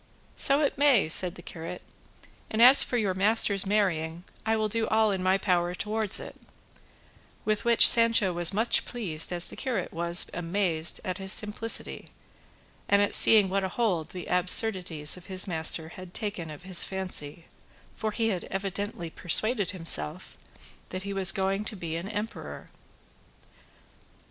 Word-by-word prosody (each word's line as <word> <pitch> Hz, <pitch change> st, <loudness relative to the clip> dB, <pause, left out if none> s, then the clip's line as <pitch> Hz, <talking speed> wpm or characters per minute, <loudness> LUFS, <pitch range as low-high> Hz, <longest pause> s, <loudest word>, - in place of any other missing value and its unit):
"So 280 Hz, +1 st, +3 dB
it 280 Hz, -2 st, -1 dB
may," 280 Hz, -, +4 dB
said 180 Hz, +2 st, 0 dB
the 175 Hz, -, -13 dB
curate; 165 Hz, +2 st, -9 dB, 0.7 s
"and 220 Hz, -, -4 dB
as 255 Hz, +4 st, +8 dB
for 245 Hz, -, 0 dB
your 205 Hz, -5 st, -1 dB
master's 200 Hz, 0 st, +1 dB
marrying, 175 Hz, -5 st, -1 dB, 0.2 s
I 225 Hz, -, +2 dB
will 215 Hz, 0 st, -1 dB
do 225 Hz, +1 st, -2 dB
all 220 Hz, -1 st, +2 dB
in 190 Hz, -2 st, -3 dB
my 185 Hz, +1 st, +2 dB
power 180 Hz, -2 st, -1 dB
towards 215 Hz, 0 st, 0 dB
it:" -, -, -10 dB, 1.1 s
with 215 Hz, +1 st, -2 dB
which 235 Hz, -1 st, +6 dB
Sancho 230 Hz, -5 st, +3 dB
was 175 Hz, -1 st, +4 dB
as -, -, -7 dB
much 225 Hz, +3 st, +2 dB
pleased 180 Hz, -11 st, -3 dB
as 175 Hz, -1 st, +3 dB
the -, -, -6 dB
curate 240 Hz, -10 st, -4 dB
was 170 Hz, +1 st, +5 dB
amazed 170 Hz, -2 st, -2 dB
at 185 Hz, +1 st, -4 dB
his 190 Hz, 0 st, -1 dB
simplicity 215 Hz, +3 st, -2 dB, 0.8 s
and 200 Hz, -, +4 dB
at 205 Hz, -, 0 dB
seeing 215 Hz, -3 st, +8 dB
what 195 Hz, +1 st, -2 dB
a 190 Hz, -, -2 dB
hold 180 Hz, -7 st, -2 dB
the 180 Hz, -1 st, -8 dB
absurdities 180 Hz, -4 st, 0 dB
of 180 Hz, -, -14 dB
his 185 Hz, -1 st, -1 dB
master 160 Hz, -1 st, 0 dB
had 185 Hz, +1 st, -12 dB
taken 200 Hz, -7 st, -5 dB
of 150 Hz, +2 st, -11 dB
his 185 Hz, -2 st, +1 dB
fancy, 175 Hz, -5 st, -4 dB, 0.5 s
for 220 Hz, -, -3 dB
he 225 Hz, +1 st, -1 dB
had 185 Hz, -5 st, -4 dB
evidently 195 Hz, -3 st, -5 dB
persuaded 205 Hz, +5 st, 0 dB
himself 165 Hz, -, 0 dB, 0.5 s
that 185 Hz, +1 st, -6 dB
he 200 Hz, 0 st, -5 dB
was 195 Hz, -1 st, +2 dB
going 195 Hz, 0 st, -2 dB
to 215 Hz, -, -3 dB
be 170 Hz, -4 st, -6 dB
an 170 Hz, +4 st, -6 dB
emperor. 215 Hz, +1 st, -7 dB
190 Hz, 165 wpm, -26 LUFS, 175-215 Hz, 1.1 s, as